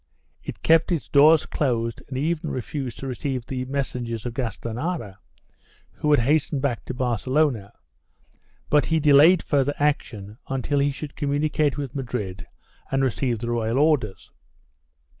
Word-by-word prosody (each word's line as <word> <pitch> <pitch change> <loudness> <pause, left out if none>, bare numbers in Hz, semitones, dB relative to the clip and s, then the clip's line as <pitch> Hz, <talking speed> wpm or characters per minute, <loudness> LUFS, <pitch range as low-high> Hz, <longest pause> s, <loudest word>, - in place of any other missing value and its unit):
It - - -8
kept 165 +2 +4
its 165 -4 -1
doors 150 +2 +6
closed 115 -5 -1
and 130 - -5
even 155 +3 -1
refused 130 0 -4
to 135 - -6
receive 130 -1 -3
the 130 0 -4
messengers 125 -4 -3
of 120 - -3
Gastanara, 115 - -4 0.7
who 150 - -3
had 145 -5 +5
hastened 145 +1 +1
back 130 -5 -1
to 130 - -5
Barcelona, 125 -2 0 1.0
but 145 -4 +4
he 160 - +2
delayed 155 +4 +6
further 145 -1 +1
action 110 -8 -2
until 135 +2 -1
he 140 +1 +2
should 145 +1 -7
communicate 145 0 0
with 140 -3 -4
Madrid 115 -9 -4 0.4
and 135 0 +1
receive 125 -1 0
the 120 +2 -4
royal 115 +1 0
orders. 140 -9 +1
135 Hz, 140 wpm, -24 LUFS, 120-145 Hz, 1.0 s, doors